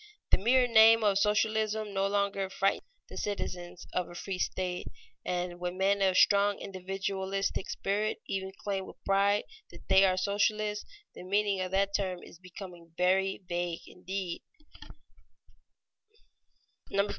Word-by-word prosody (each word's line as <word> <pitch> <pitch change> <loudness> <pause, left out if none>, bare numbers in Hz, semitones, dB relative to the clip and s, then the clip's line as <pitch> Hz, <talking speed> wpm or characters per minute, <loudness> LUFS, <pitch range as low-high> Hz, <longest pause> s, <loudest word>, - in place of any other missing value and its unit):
The - - +5
mere 250 +5 +4
name 225 -1 +7
of 200 -2 +3
socialism 215 0 +1
no 195 0 +1
longer 200 -1 0
frightens 195 - 0 0.2
the - - -10
citizens 180 -3 -4
of 180 -1 -1
a 175 - -11
free 185 +1 -4
state, 180 -1 -2 0.4
and 175 0 -3
when 180 +1 -4
men 200 +1 +2
of 190 -1 +3
strong 200 0 +5
individualistic 195 +1 -3
spirit 210 +2 -1
even 190 -1 -3
claim 195 -2 -2
with - - -11
pride 200 +1 +3 0.3
that - - -15
they 190 - +7
are 185 -1 +3
socialists, 210 +2 0 0.3
the - - -10
meaning 200 +1 +1
of 185 - -2
that 195 +1 +1
term 185 -3 -2
is 170 - -14
becoming 180 -2 -11
very 190 +2 +2
vague 175 -1 -2
indeed. 185 -1 -5
195 Hz, 135 wpm, -30 LUFS, 185-205 Hz, 0.4 s, name